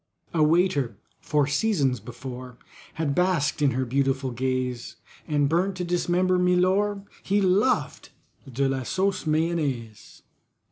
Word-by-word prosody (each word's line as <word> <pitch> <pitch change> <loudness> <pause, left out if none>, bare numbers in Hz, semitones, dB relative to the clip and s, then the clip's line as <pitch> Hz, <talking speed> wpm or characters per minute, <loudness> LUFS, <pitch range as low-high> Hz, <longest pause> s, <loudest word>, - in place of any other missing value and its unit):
A 165 - +1
waiter, 150 - +2 0.2
for 150 -2 +1
seasons 145 - +1
before, 125 +2 -9 0.4
Had 155 -3 -1
basked 175 -4 +1
in 145 - +4
her 130 +1 -1
beautiful 135 +1 0
gaze, 125 0 -2 0.3
And 145 -3 +2
burnt 180 +5 +1
to 180 - -3
dismember 180 +1 +1
MILOR, 185 +3 +2 0.2
He 200 +1 +1
loved 200 +6 +1 0.4
DE 135 +3 0
LA 135 -1 -1
SAUCE 190 +5 -1
MAYONNAISE. 155 -9 -2
150 Hz, 125 wpm, -25 LUFS, 130-180 Hz, 0.4 s, in